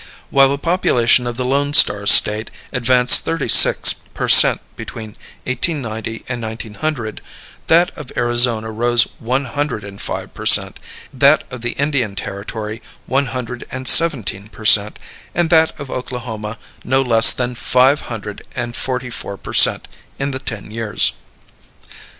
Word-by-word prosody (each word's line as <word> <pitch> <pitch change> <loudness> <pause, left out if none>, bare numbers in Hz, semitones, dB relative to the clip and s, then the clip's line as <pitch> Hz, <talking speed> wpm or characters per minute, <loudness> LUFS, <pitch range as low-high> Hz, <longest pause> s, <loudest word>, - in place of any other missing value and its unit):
While 135 0 +4
the 140 - -2
population 125 -7 0
of 120 -1 -6
the 130 - -3
Lone 140 +2 -1
Star 100 -9 +4
State 105 +2 +5 0.2
advanced 125 0 +4
thirty 165 -5 -4
six - - +6 0.2
per - - -4
cent - - +6 0.2
between 110 -1 -9 0.4
1890 120 -5 -5
and 120 -2 -6
1900, 110 +2 -6 0.5
that 170 +2 +2
of 150 -5 -11
Arizona 120 -2 +1
rose 120 +1 +2 0.2
one 130 +4 -3
hundred 145 -3 -4
and 100 0 -10
five - - -5
per - - -6
cent, - - +3 0.3
that - - +3
of 130 -2 -9
the 120 +1 -4
Indian 135 -8 -2
Territory 105 +4 -7 0.2
one 135 +1 -1
hundred 125 0 -7
and 130 0 -6
seventeen 120 -12 +4
per 110 0 -14
cent, 105 0 +4 0.4
and 170 0 -1
that 160 -1 +2
of 140 -2 -9
Oklahoma 115 -4 -7 0.3
no 130 +2 0
less 115 -3 +5
than 125 0 -3
five 130 +4 +1
hundred 105 -3 -8
and 120 -1 -5
forty 125 -1 -4
four 100 -3 -7
per - - -11
cent - - +3 0.3
in 140 +1 -3
the 130 - -6
ten 110 -5 -8
years. 110 -1 0
120 Hz, 150 wpm, -16 LUFS, 110-135 Hz, 0.5 s, six